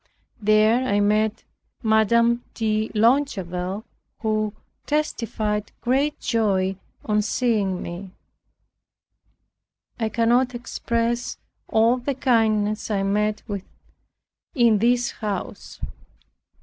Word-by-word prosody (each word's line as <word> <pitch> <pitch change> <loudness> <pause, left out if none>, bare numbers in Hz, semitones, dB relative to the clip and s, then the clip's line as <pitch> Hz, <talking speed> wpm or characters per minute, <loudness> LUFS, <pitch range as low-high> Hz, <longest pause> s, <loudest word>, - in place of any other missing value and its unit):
There 215 +4 +4
I 205 -4 +2
met 210 +1 +1 0.4
Madame 235 +2 +3
de 215 -1 0
Longueville, 210 -6 +1 0.4
who 215 -1 0 0.4
testified 220 -8 -1
great 275 +4 0
joy 195 -5 +1 0.3
on 210 -1 +2
seeing 210 -4 0
me. 175 +3 -7 1.9
I 220 -1 0
cannot 240 +3 +2
express 235 0 -2 0.3
all 230 +3 +3
the 260 +2 -3
kindness 220 -4 +1
I 200 -2 0
met 210 +2 0
with 200 -2 -3 0.9
in 235 -5 +4
this 240 +2 +2
house. 210 -3 -5
220 Hz, 90 wpm, -23 LUFS, 210-235 Hz, 1.9 s, There